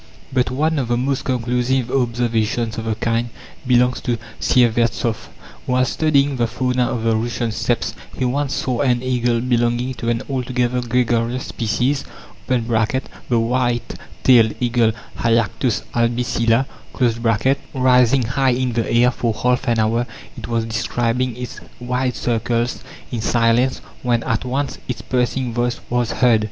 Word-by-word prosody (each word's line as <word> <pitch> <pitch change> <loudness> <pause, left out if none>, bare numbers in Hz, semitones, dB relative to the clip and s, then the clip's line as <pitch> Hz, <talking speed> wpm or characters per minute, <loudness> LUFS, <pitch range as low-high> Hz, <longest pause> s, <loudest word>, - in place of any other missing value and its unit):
But 130 -1 +2
one 155 +4 0
of 130 - -1
the 120 0 +1
most 135 +2 -1
conclusive 125 0 0
observations 115 -2 0
of 110 - -5
the 110 -1 -1
kind 115 +2 -1 0.4
belongs 125 0 +3
to 120 -2 -1 0.2
Syevertsoff. 115 -1 +2 0.4
Whilst 125 0 +1
studying 145 -3 +2
the 120 -1 +1
fauna 125 +1 0
of 115 - -2
the 115 -1 +2
Russian 115 +1 -1
Steppes, 110 - -1 0.2
he 130 - 0
once 135 +2 0
saw 125 -3 -1
an 125 -3 +2
eagle 120 -2 +1
belonging 120 +1 +1
to 115 - -2
an 115 -1 0
altogether 125 -2 -1
gregarious 120 0 0
species 125 +5 -1 0.4
(the 125 -2 +2 0.8
white 120 0 0 0.3
tailed 115 -4 +5
eagle, 120 -2 +2 0.3
Haliactos 115 -1 +1
albicilla) 120 +1 +1 1.1
rising 130 0 +4
high 135 +3 +1
in 125 0 -1
the 115 -1 -1
air 120 +1 +4
for 115 -2 -1
half 125 +3 0
an 120 -1 +2
hour 115 +2 +1 0.3
it - - -7
was 115 -1 0
describing 115 +2 -1
its 125 0 -6 0.2
wide 125 +1 -1
circles 120 +1 -1 0.3
in 120 -3 -2
silence 120 +3 +2 0.2
when 120 -2 +1
at 115 +2 -1
once 135 +3 -2
its 125 - -4
piercing 125 -1 -1
voice 120 0 -1
was 120 -1 +1
heard. 120 -4 +4
120 Hz, 145 wpm, -20 LUFS, 115-125 Hz, 1.1 s, tailed